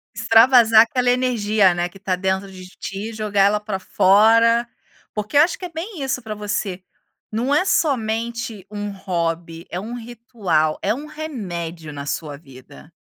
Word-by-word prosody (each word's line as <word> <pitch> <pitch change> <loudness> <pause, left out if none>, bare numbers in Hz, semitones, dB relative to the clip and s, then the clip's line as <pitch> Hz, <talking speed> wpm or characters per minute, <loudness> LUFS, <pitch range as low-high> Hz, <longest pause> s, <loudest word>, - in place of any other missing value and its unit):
Extravasar 225 0 +6
aquela 245 +2 +1
energia, 220 -6 +2
né, 175 0 -2
que 185 - -15
tá 185 -1 -1
dentro 190 +1 -2
de 185 -1 -11
ti. 200 +3 -5
Jogar 210 -2 0
ela 210 +1 +3
para 210 -2 -4
fora. 225 +5 +4 0.5
Porque 210 +5 -5
eu - - +8
acho 335 +3 +2
que 370 - -7
é - - -6
bem 335 -1 -6
isso 260 -1 -2
para 215 - -5
você, 205 -2 -3 0.5
não 240 +6 0
é 365 +6 +3
somente 230 - -1
um 205 0 -4
hobby, 170 -3 -3
é 175 - -4
um 220 +5 -7
ritual, 225 -10 -2
é 200 - 0
um 280 +6 -7
remédio 175 - -6
na 140 0 -7
sua 150 -1 -4
vida. 130 - -15
210 Hz, 165 wpm, -21 LUFS, 185-235 Hz, 0.5 s, eu